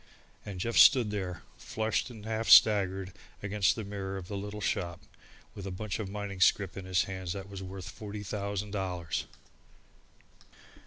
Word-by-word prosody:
And 95 -3 -6
Jeff 115 +5 -1
stood 120 -6 +7
there 95 -4 -4 0.2
flushed 110 +3 -1
and 110 -4 -11
half 110 0 -2
staggered 95 -3 +6 0.3
against 100 -2 +2
the 110 - -4
mirror 95 -1 -5
of 90 -1 -8
the 100 - -4
little 105 +1 -5
shop, 85 -3 -2 0.5
with 100 -1 -7
a - - -3
bunch 95 +2 -4
of 105 -3 -4
mining 100 -1 -5
scrip 95 -1 +3
in 95 - -7
his 95 -1 +2
hand 95 -2 -6
that 100 -1 -7
was 100 -1 -8
worth 95 0 -7
forty 105 0 -7
thousand 100 0 -3
dollars! 90 -5 -2
100 Hz, 165 wpm, -30 LUFS, 95-105 Hz, 0.5 s, stood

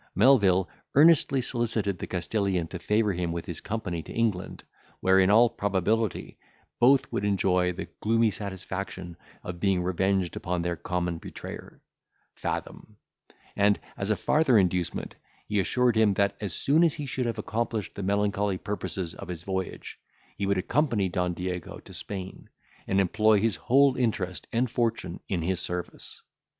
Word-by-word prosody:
Melvil 100 -6 +5 0.3
earnestly 145 -3 +5
solicited 115 -6 -1
the - - -5
Castilian 95 -1 -1
to 90 - -6
favour 105 +2 +1
him 85 -1 -2
with 85 0 -4
his 85 - -5
company 100 -6 -3
to - - -11
England, 110 -6 -1 0.4
where, 95 0 +4
in 95 0 +4
all 115 +4 +7
probability, 105 +1 -1 0.4
both 130 +3 +4
would - - -2
enjoy 90 -2 +2
the 90 - -6
gloomy 115 0 +2
satisfaction 95 -2 -6 0.3
of 90 -1 -6
being 95 -2 +1
revenged 95 0 0
upon 90 -1 -2
their 85 0 -1
common 85 -1 -2
betrayer, - - -9 0.5
Fathom; - - -5 0.6
and, 100 0 +3 0.2
as 100 - -3
a 110 - +3
farther 135 - +3
inducement, 90 -3 0 0.3
he 105 -1 0
assured 120 +6 +2
him, 110 -3 +4
that, 100 0 +1
as 100 -3 -3
soon 155 +5 +3
as 165 -4 +3
he 150 - -5
should 130 -2 -2
have 115 -1 -2
accomplished 110 -1 -2
the - - -6
melancholy 100 0 0
purposes 95 -3 -3
of - - -9
his 90 -2 -6
voyage, 95 -1 -4 0.4
he 100 - -2
would 100 -1 +2
accompany 115 -1 +1
Don 90 0 -1
Diego 90 0 -4
to - - -14
Spain, 95 -2 -7 0.4
and 95 - +2
employ 110 +3 +3
his 110 -2 +1
whole 135 - +4
interest 90 - -1
and 120 +2 +1
fortune 115 -7 -2
in 90 -4 -1
his 90 +1 0
service. 90 -1 -5
100 Hz, 160 wpm, -27 LUFS, 90-115 Hz, 0.6 s, all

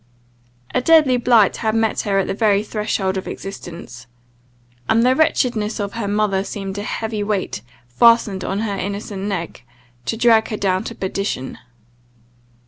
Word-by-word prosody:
A 255 - +2
deadly 300 -3 +5
blight 235 -4 +4
had 220 -1 -1
met 225 -1 +1
her 200 -1 0
at 195 - +2
the - - -2
very 205 -1 +2
threshold 210 -3 -2
of 190 - -5
existence; 165 -10 -8 0.8
and 230 +2 +4
the 255 +1 +4
wretchedness 240 -8 +1
of 200 -1 -3
her 225 -3 -3
mother 205 -2 +1
seemed 195 0 -5
a - - -3
heavy 220 0 -3
weight 205 - -2 0.3
fastened 205 - +3
on 195 +3 -2
her 210 -3 -2
innocent 200 0 -5
neck, 170 -10 -4 0.4
to 225 - -2
drag 225 -1 +4
her 215 - -4
down 190 -2 0
to - - -6
perdition. 190 -8 -4
205 Hz, 155 wpm, -20 LUFS, 195-225 Hz, 0.8 s, deadly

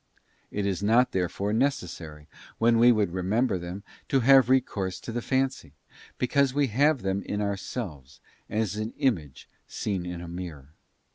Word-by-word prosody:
It 100 -1 -2
is 95 -1 -1
not 115 +5 +4
therefore 95 +3 -1
necessary 85 - -2 0.3
when 115 0 +3
we 120 +1 +7
would 105 -6 +1
remember 95 +4 0
them 90 +3 -7 0.3
to 135 - +3
have 135 0 +6
recourse 100 -8 +1
to - - -7
the 120 +1 -2
fancy, 130 - -1 0.4
because 135 +1 +1
we 145 -2 +2
have 145 +1 +3
them 95 0 -1
in 105 - -4
ourselves, 95 - -5 0.3
as 105 -2 -1
an 110 +1 -3
image 85 - -1 0.2
seen 95 -4 -3
in 90 -1 -5
a 85 - -8
mirror. 85 -5 -8
105 Hz, 155 wpm, -27 LUFS, 90-125 Hz, 0.4 s, we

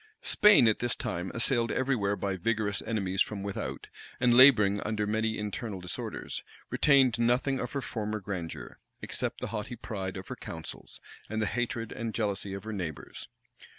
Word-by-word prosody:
Spain, 210 - +6
at 110 - +3
this 120 0 0
time, 90 +2 -3
assailed 115 0 +1
every 135 0 +1
where 100 -3 0
by 100 -2 -2
vigorous 105 +1 0
enemies 95 -3 0
from 100 -2 0
without, 100 -1 -4 0.3
and 120 -1 +4
laboring 105 -6 +7
under 105 0 -1
many 110 +1 0
internal 105 -1 -4
disorders, 90 0 -5 0.3
retained 135 -5 +4
nothing 125 +3 +2
of 125 - -4
her 140 - -1
former 110 -3 -3
grandeur, 90 -4 -6 0.2
except - - -3
the - - -2
haughty 110 +3 -4
pride 95 -5 -5
of 95 - -8
her - - -4
counsels, - - -8 0.3
and 110 - -2
the 110 - +1
hatred 115 0 -2
and 115 -1 -4
jealousy 100 -3 -1
of 100 - -7
her 110 0 -5
neighbors. 85 -7 -6
110 Hz, 170 wpm, -29 LUFS, 100-120 Hz, 0.3 s, laboring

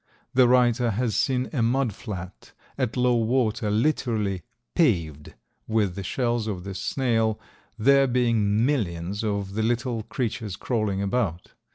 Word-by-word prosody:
The 125 -1 +5
writer 120 -1 +3
has 115 +1 -1
seen 130 -2 +1
a 130 - 0
mud 120 0 +1
flat 95 -4 -8 0.2
at 130 -3 -2
low 125 0 +3
water 115 -2 +1
literally 110 -5 0 0.3
paved 85 - 0 0.3
with 110 -4 +1
the 100 - -5
shells 120 +2 -1
of 95 -5 -4
this 100 0 -6
snail, 115 -5 0 0.4
there 135 +4 +5
being 115 -3 +2
millions 100 - -1
of 100 -2 -2
the 110 - -1
little 120 +1 0
creatures 115 -3 -3
crawling 105 -4 -1
about. 100 -5 -1
115 Hz, 140 wpm, -25 LUFS, 100-125 Hz, 0.4 s, The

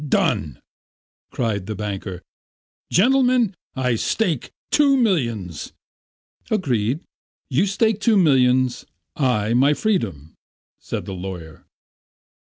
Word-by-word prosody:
Done!" 75 - 0 0.7
cried 105 -6 -2
the 110 - -3
banker. 100 -3 -5 0.7
"Gentlemen, 250 0 +3 0.2
I 125 -3 0
stake 165 - -1 0.2
two 280 -2 +4
millions." 115 - -1 0.8
"Agreed. 135 - 0 0.5
You 160 +10 +2
stake 215 +1 +1
two 220 -1 +4
millions, 130 -6 +3 0.3
I 115 -6 +1
my 140 +5 +4
freedom," 100 - -2 0.5
said - - -5
the 95 - -6
lawyer. 90 -5 -8
125 Hz, 95 wpm, -22 LUFS, -, 0.8 s, two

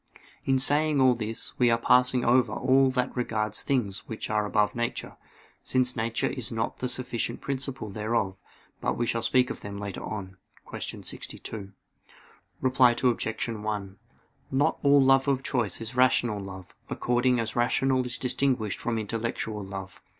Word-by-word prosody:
In 135 0 +3
saying 145 +2 +3
all 130 -1 +6
this, 110 -1 -4
we 125 -1 +5
are 115 - +4
passing 125 +1 +3
over 120 -2 +4
all 135 +3 +4
that 125 0 -1
regards 110 -4 -1
things 115 -7 -1
which 110 -1 -5
are 105 -1 +1
above 105 0 +2
nature, 120 0 -3 0.5
since 125 -1 +1
nature 115 +1 -1
is 130 -4 -2
not 115 0 -2
the 125 - -1
sufficient 120 -2 -2
principle 135 -5 -4
thereof: 105 -2 -1 0.4
but - - -1
we 120 - 0
shall 115 0 -1
speak 125 +2 +2
of - - -7
them 100 0 -6
later 100 -2 -5
on 95 -3 -6 0.3
(Q. - - -6
62). 100 -3 -6 0.9
Reply 130 -2 +4
Obj. 115 -2 +1
1: 105 -3 -4 0.5
Not 135 +2 +1
all 140 -1 +6
love 135 +1 +4
of 135 -1 +1
choice 120 -8 -1
is 115 +2 -5
rational 120 -4 +3
love, 95 -2 -9 0.2
according 125 0 +1
as 110 -1 -2
rational 130 +2 +2
is 125 -1 -4
distinguished 125 -4 0
from 120 -1 -1
intellectual 110 -1 -3
love. 95 0 -8
120 Hz, 155 wpm, -27 LUFS, 110-130 Hz, 0.9 s, all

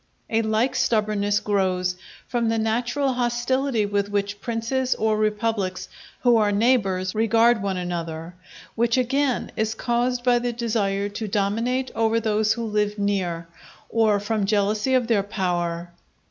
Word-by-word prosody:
A 225 0 +3
like 220 +3 +1
stubbornness 210 -2 +1
grows 185 -3 0 0.3
from 235 -2 0
the 225 - +1
natural 240 +5 0
hostility 245 0 0
with 205 0 -1
which 205 0 -2
princes 240 +4 -1
or 220 0 +1
republics 215 -3 -1 0.3
who 240 -2 +5
are 210 -2 +3
neighbours 200 -4 +1
regard 225 +1 +3
one 195 -2 -2
another; 170 -2 -4 0.4
which 235 +2 +1
again 260 +1 0
is 220 0 -1
caused 245 0 0
by 245 -1 +4
the 240 0 -2
desire 210 -4 -1
to 215 +2 -5
dominate 225 +6 0
over 225 0 +2
those 215 -1 +1
who 235 - -4
live 210 -1 0
near, 185 -5 -1 0.4
or 220 -3 +3
from 205 -1 -1
jealousy 210 +4 +1
of 250 -2 +2
their 225 -3 +2
power. 175 -4 -2
215 Hz, 145 wpm, -24 LUFS, 200-235 Hz, 0.4 s, who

